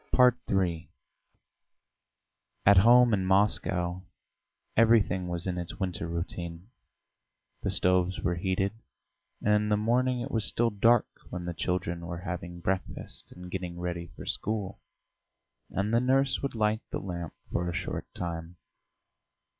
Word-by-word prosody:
III 85 -4 0 1.8
At 100 0 +7
home 120 +3 +7
in 95 -2 +2
Moscow 95 -2 +2 0.7
everything 110 -5 +4
was 85 -1 -3
in 90 -1 -2
its 85 - -6
winter 90 -4 -2
routine; 85 +3 -5 0.9
the - - -1
stoves 90 0 +2
were 85 - 0
heated, 95 +3 0 0.7
and 105 - +4
in 105 0 +2
the 105 - +3
morning 125 +4 +2
it - - -5
was 110 -2 +1
still 115 +3 +1
dark 115 +3 +4 0.2
when 90 -1 -5
the 85 - -3
children 85 0 -2
were 85 0 -5
having 85 -1 -5
breakfast 95 +1 -3
and 90 0 -10
getting 90 -2 -4
ready 85 -1 -3
for - - -9
school, 105 -2 -3 0.9
and 100 +3 -1
the 115 - +4
nurse 135 +1 +2
would 140 -3 -3
light 110 0 +1
the - - -2
lamp 85 -5 -5 0.2
for 85 0 -1
a - - -3
short - - -3
time. 85 0 -5
95 Hz, 140 wpm, -29 LUFS, 85-105 Hz, 1.8 s, At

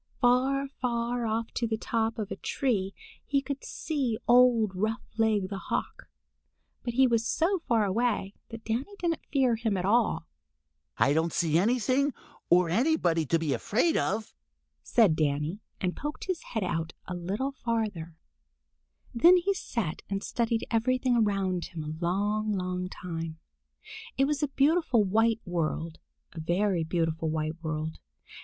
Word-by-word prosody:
Far, 265 +3 +3
far 240 -3 -2
off 225 +1 -2
on 235 - +1
the 220 - 0
top 225 0 -1
of 215 -2 -4
a - - -2
tree 200 -8 -1 0.3
he 280 - +1
could 275 0 -5
see 270 -8 -2
old 240 -4 +5
Roughleg 220 0 0
the 195 -1 -4
Hawk, - - -3 0.7
but 240 -1 -4
he 265 +1 +6
was 230 -2 +2
so 365 +4 +1
far 230 -4 +3
away 205 -1 0 0.2
that 225 -1 -9
Danny 250 - -2
didn't 335 -4 -1
fear 260 -4 +3
him 220 -3 0
at 180 - -1
all. 230 +3 +2 0.7
"I 140 - +4
don't 160 +2 +1
see 160 -2 +1
anything 255 +6 +2 0.3
or 175 0 +5
anybody 175 - +2
to 165 - +3
be 160 -4 -1
afraid 250 - +1
of," 215 +3 -1 0.5
said 215 -9 +4
Danny 150 +4 0 0.2
and 180 -1 -1
poked 295 +1 -5
his 370 -3 -2
head 220 - +1
out 165 -3 -2
a 180 - -4
little 195 +10 -2
farther. 215 -11 -3 1.0
Then 345 +10 +7
he 380 +3 +1
sat 230 - -3
and 195 0 -2
studied 230 -1 -1
everything 250 +2 +2
around 195 -5 +1
him 160 -3 -7
a 155 +3 -6
long, 210 +4 0
long 180 -1 -2
time. 165 -3 -6 0.8
It 270 - +4
was 295 0 -1
a 295 - +2
beautiful 280 -4 +3
white 225 +3 +2
world, 165 -2 -2 0.3
a 165 - -7
very 175 +2 +1
beautiful 165 -1 -1
white 155 +1 -2
world. 160 0 -3
220 Hz, 150 wpm, -28 LUFS, 175-245 Hz, 1.0 s, Then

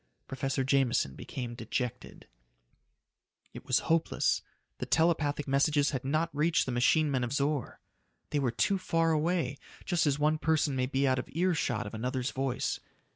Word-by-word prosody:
Professor 135 0 -2
Jameson 130 - +2
became 120 - -6
dejected. 125 +1 -5 1.3
It - - -10
was 130 - +3
hopeless. 165 0 +1 0.4
The - - -4
telepathic 155 -3 +1
messages 145 +1 +2
had 130 -2 -3
not 155 +4 -1
reached 160 +3 +2
the 130 - -3
machine 145 +5 +3
men 130 -2 0
of 120 - -3
Zor. 140 -1 -1 0.5
They 150 - +1
were 135 -3 +1
too 195 - +1
far 165 -2 +1
away, 155 -3 0 0.3
just 175 -4 +1
as 140 -1 +2
one 155 +1 +2
person 155 -3 +1
may 130 -1 0
be 135 +1 +1
out 130 0 +2
of - - -6
earshot 160 - 0
of 105 - -7
another's 125 +3 -2
voice. 130 -2 -2
140 Hz, 160 wpm, -30 LUFS, 130-155 Hz, 1.3 s, was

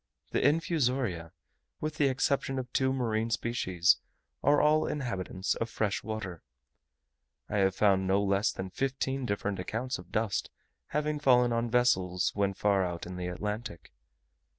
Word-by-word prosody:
The - - +1
infusoria, 130 - +1 0.5
with 155 0 -3
the 145 - +4
exception 135 0 0
of 125 -2 -5
two 130 -1 +2
marine 115 -4 0
species, 95 - +2 0.4
are 145 0 +4
all 155 +1 +4
inhabitants 100 -8 -2
of 115 - -3
fresh 105 -3 -1
water. 100 -6 -5 1.1
I 105 - -2
have 95 -1 +3
found 95 -2 +3
no 95 +1 +3
less 100 +2 +2
than 95 0 -6
fifteen 135 +3 -2
different 100 -2 -2
accounts 115 +7 -3
of 90 0 -13
dust 110 -2 -1 0.4
having 150 0 -1
fallen 125 -4 +4
on 115 0 0
vessels 95 -7 +2
when 100 -1 0
far 100 -1 +2
out 85 -2 -4
in 90 +1 -7
the 90 0 -4
Atlantic. 105 +1 -5
110 Hz, 150 wpm, -30 LUFS, 95-130 Hz, 1.1 s, the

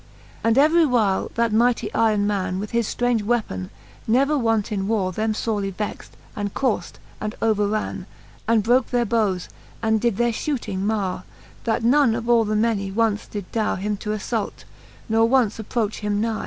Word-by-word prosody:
XLIV. - - -25
And 230 +2 +3
every 315 +4 +5
while 215 -7 +1
that 230 -1 +1
mightie 235 -1 +2
yron 215 -2 +2
man, 195 -3 -1
With 205 +2 -5
his 235 -2 +1
ftrange 245 -2 0
weapon, 205 - -1 0.4
never 275 +6 +3
wont 225 -5 +1
in 195 -2 -1
warre, 200 -4 0
Them 215 +3 -1
forely 210 -3 -1
vext, 205 +2 -6 0.2
and 205 -1 -3
courft, 255 -5 -1 0.3
and 215 0 -4
overran. 210 -3 0 0.4
And 225 -2 +3
broke 245 +3 +3
their 245 -1 +1
bowes, 205 -5 0 0.3
and 220 -1 +1
did 235 -5 +1
their 240 0 +2
fhooting 235 -6 -3
marre. 195 -3 -1 0.4
That 225 0 0
none 250 -1 +4
of 230 0 -4
all 235 -2 +4
the 215 0 -1
many 210 -3 +1
once 220 +1 0
did 205 -3 -7
darre 220 -3 0
Him 210 +2 -2
to 210 - -6
alTault, 215 +1 -3 0.4
nor 225 +1 +3
once 240 -5 +2
approach 220 -1 -2
him 210 -1 -1
nie. 225 0 -1
220 Hz, 180 wpm, -23 LUFS, 205-235 Hz, 0.4 s, every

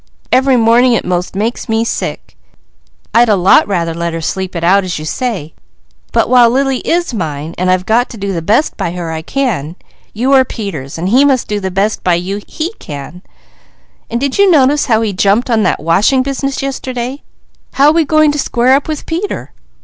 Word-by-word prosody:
Every 260 0 +3
morning 235 +2 +4
it - - 0
'most 180 +1 -2
makes 225 +4 -3
me 225 +1 +1
sick. - - -4 0.8
I'd 235 0 +4
a 210 - +4
lot 190 +1 +4
rather 170 -4 -1
let 170 0 -3
her 165 - -3
sleep 185 +3 -4
it 170 - -3
out 195 +3 +4
as 180 -2 -4
you 155 - -6
say, 185 - -3 0.6
but - - +2
while 245 -2 +5
Lily 270 +1 0
is 345 -5 -1
mine, 160 -5 -4
and 185 0 0
I've 185 0 +1
got 235 +4 +1
to 235 - -10
do 200 -1 -3
the 170 - -3
best 215 - +1
by 170 - -3
her 175 -2 -5
I 160 0 -4
can, 180 - -2 0.4
you 255 +6 0
are 265 -1 +6
Peter's 180 - -6
so 165 - -4
he 245 +9 +4
must 270 -3 +2
do 210 -1 -2
the 190 -1 -3
best 195 +3 -1
by 180 -2 +2
you 190 +4 -3
he 330 +6 -4
can; 150 +4 -8 0.9
and 235 - -2
did 280 +6 -2
you 400 -1 +5
notice 290 -3 +3
how 225 -2 +2
he 210 -2 -2
jumped 200 +6 +1
on 225 -1 +2
that - - +1
washing 205 - +2
business 275 0 -3
yesterday? 260 0 -4 0.5
How 285 +2 +5
we 325 +1 +2
going 310 0 +3
to 295 - -3
square 250 0 +2
up 275 +1 +1
with 310 -1 -4
Peter?" 330 - -4
225 Hz, 205 wpm, -14 LUFS, 180-265 Hz, 0.9 s, are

